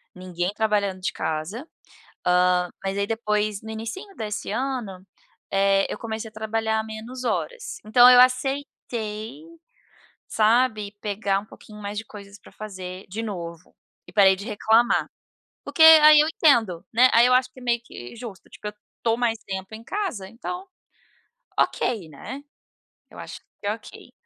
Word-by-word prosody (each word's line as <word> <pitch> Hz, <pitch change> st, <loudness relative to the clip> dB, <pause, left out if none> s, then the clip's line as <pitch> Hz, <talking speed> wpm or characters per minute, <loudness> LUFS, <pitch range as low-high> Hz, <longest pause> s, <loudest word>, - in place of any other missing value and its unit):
ninguém 180 Hz, 0 st, -3 dB
trabalhando 205 Hz, -3 st, 0 dB
de -, -, -1 dB
casa. 170 Hz, -, -4 dB, 0.6 s
Ah, 180 Hz, 0 st, +3 dB
mais 195 Hz, 0 st, -2 dB
ai, 200 Hz, 0 st, 0 dB
depois, 210 Hz, -2 st, -1 dB
no 220 Hz, 0 st, -8 dB
inicinho 230 Hz, -, -7 dB
desse 210 Hz, -2 st, -4 dB
ano, 235 Hz, -7 st, -3 dB, 0.5 s
eh, 195 Hz, 0 st, +3 dB
eu -, -, -4 dB
comecei 220 Hz, -1 st, -5 dB
a -, -, -31 dB
trabalhar 220 Hz, 0 st, -1 dB
menos 225 Hz, +4 st, -8 dB
horas. -, -, -3 dB
Então 245 Hz, +3 st, +7 dB
eu 250 Hz, -, +8 dB
aceitei, 255 Hz, -2 st, -1 dB, 0.9 s
sabe, 215 Hz, -2 st, +2 dB
pegar 200 Hz, -1 st, -1 dB
um 210 Hz, -, -15 dB
pouquinho 210 Hz, -1 st, -14 dB
mais 205 Hz, 0 st, -5 dB
de 220 Hz, -, -5 dB
coisas 200 Hz, -1 st, -12 dB
pra -, -, -17 dB
fazer 185 Hz, -3 st, -8 dB
de 210 Hz, +5 st, -5 dB
novo 170 Hz, -5 st, -7 dB, 0.3 s
e -, -, -13 dB
parei 195 Hz, -2 st, +6 dB
de 200 Hz, +3 st, -9 dB
reclamar. 225 Hz, +2 st, +2 dB, 0.6 s
Porque 320 Hz, -, -3 dB
aí 310 Hz, -1 st, +9 dB
eu 305 Hz, -, +4 dB
entendo, 230 Hz, -, +2 dB
né. 250 Hz, +3 st, +6 dB
Aí 235 Hz, +1 st, +7 dB
eu 250 Hz, -, +3 dB
acho 255 Hz, 0 st, +3 dB
que 255 Hz, -, -15 dB
é -, -, -13 dB
meio 240 Hz, -1 st, +1 dB
que 120 Hz, -, -10 dB
justo, 225 Hz, -5 st, -10 dB
tipo, 210 Hz, -, -9 dB
eu 210 Hz, -, -5 dB, 0.3 s
estou 230 Hz, 0 st, +1 dB
mais 235 Hz, -2 st, 0 dB
tempo 190 Hz, +2 st, -6 dB
em 225 Hz, -, -11 dB
casa, 350 Hz, -, -4 dB
então 360 Hz, +11 st, -7 dB, 0.9 s
ok, 210 Hz, -9 st, 0 dB
né. 260 Hz, -, -8 dB, 0.7 s
Eu -, -, -15 dB
acho -, -, -8 dB
que 200 Hz, -, -11 dB
é 210 Hz, -, +1 dB
ok, 225 Hz, -, -12 dB
220 Hz, 160 wpm, -24 LUFS, 200-245 Hz, 0.9 s, aí